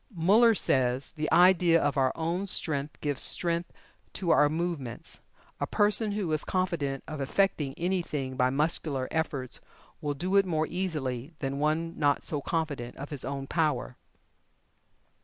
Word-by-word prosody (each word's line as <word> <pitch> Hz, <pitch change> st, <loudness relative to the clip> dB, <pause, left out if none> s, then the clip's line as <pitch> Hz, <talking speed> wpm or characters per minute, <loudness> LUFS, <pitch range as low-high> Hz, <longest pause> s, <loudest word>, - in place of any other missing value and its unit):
Muller 215 Hz, +7 st, +5 dB
says: 130 Hz, -5 st, +2 dB
"The 155 Hz, -1 st, -3 dB
idea 175 Hz, -2 st, +5 dB
of 145 Hz, -2 st, 0 dB
our 130 Hz, -2 st, +2 dB
own 170 Hz, +4 st, -2 dB
strength 150 Hz, -5 st, -1 dB
gives 145 Hz, -3 st, -1 dB
strength 170 Hz, 0 st, -1 dB, 0.4 s
to 180 Hz, -3 st, 0 dB
our 150 Hz, -2 st, +5 dB
movements. 160 Hz, -7 st, -3 dB, 0.4 s
A -, -, -1 dB
person 210 Hz, 0 st, +2 dB
who 200 Hz, -6 st, -2 dB
is 155 Hz, -1 st, +1 dB
confident 165 Hz, -8 st, -1 dB
of 155 Hz, -2 st, -5 dB
effecting 145 Hz, -2 st, 0 dB
anything 170 Hz, -7 st, -2 dB
by 125 Hz, 0 st, +2 dB
muscular 140 Hz, -1 st, 0 dB
efforts 140 Hz, -6 st, -2 dB, 0.4 s
will 145 Hz, -1 st, -2 dB
do 185 Hz, +7 st, 0 dB
it 195 Hz, -, +5 dB
more 155 Hz, -3 st, +1 dB
easily 150 Hz, -6 st, -3 dB
than 140 Hz, -1 st, -3 dB
one 160 Hz, +3 st, -1 dB
not 145 Hz, -2 st, +2 dB
so 145 Hz, -2 st, -2 dB
confident 145 Hz, -7 st, -3 dB
of 140 Hz, +2 st, -8 dB
his 145 Hz, -3 st, -1 dB
own 135 Hz, +1 st, -4 dB
power." 150 Hz, -5 st, -1 dB
155 Hz, 150 wpm, -28 LUFS, 140-175 Hz, 0.4 s, Muller